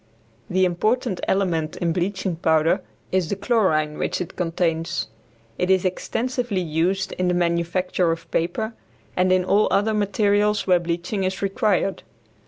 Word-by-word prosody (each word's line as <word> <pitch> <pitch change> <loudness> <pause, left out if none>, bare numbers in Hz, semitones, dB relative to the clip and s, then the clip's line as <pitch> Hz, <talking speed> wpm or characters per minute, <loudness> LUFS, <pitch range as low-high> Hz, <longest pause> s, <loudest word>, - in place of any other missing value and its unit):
The 185 +1 +3
important 195 +3 0
element 170 -5 0
in 170 -2 0
bleaching 190 0 -1
powder 160 +3 +2 0.3
is 185 -3 +1
the - - 0
chlorine 175 -9 +1
which - - -1
it 180 - -5
contains. 165 -8 -1 0.5
It 180 - 0
is 190 -1 +3
extensively 240 +3 -1
used 175 +4 0
in 180 - +1
the 180 - +2
manufacture 170 +1 +1
of 165 0 -6
paper 220 +7 -1 0.4
and 185 0 +2
in 185 -1 +3
all 205 +3 +3
other 215 +2 +2
materials 210 0 +2
where 180 -2 +4
bleaching 175 +4 -2
is 190 +1 -2
required. 195 -1 +1
185 Hz, 145 wpm, -23 LUFS, 170-200 Hz, 0.5 s, where